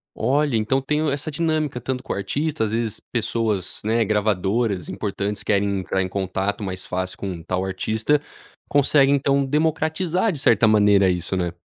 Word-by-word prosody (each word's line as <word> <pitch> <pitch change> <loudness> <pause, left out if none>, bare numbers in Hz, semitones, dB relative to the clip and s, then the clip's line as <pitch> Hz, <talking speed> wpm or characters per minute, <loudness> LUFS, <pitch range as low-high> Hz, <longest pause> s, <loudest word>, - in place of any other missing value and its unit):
Olha, 140 +2 +1
então 110 +5 +1
tem 150 +3 -1
o 155 - +1
essa 140 +2 -3
dinâmica, 155 -5 -1
tanto 130 0 -3
com - - -3
artistas, 115 +4 -1
às 105 - -5
vezes 115 -2 -1
pessoas, 110 -5 -1
né, 110 +1 +2
gravadoras 105 -1 0
importantes 100 0 -3
querem 100 -1 +1
entrar 95 0 -1
em - - -2
contato 95 +2 -2
mais 95 -1 -5
fácil 95 0 -3
com 95 -4 -5
tal 90 +3 -2
artista, 110 +9 0 0.5
conseguem 140 0 +4
então 140 0 +2
democratizar 160 +6 0
de 155 - -5
certa 110 -4 +4
maneira 105 -2 +5
isso, 90 +1 -1
né? 90 -2 -1
110 Hz, 165 wpm, -22 LUFS, 100-140 Hz, 0.5 s, maneira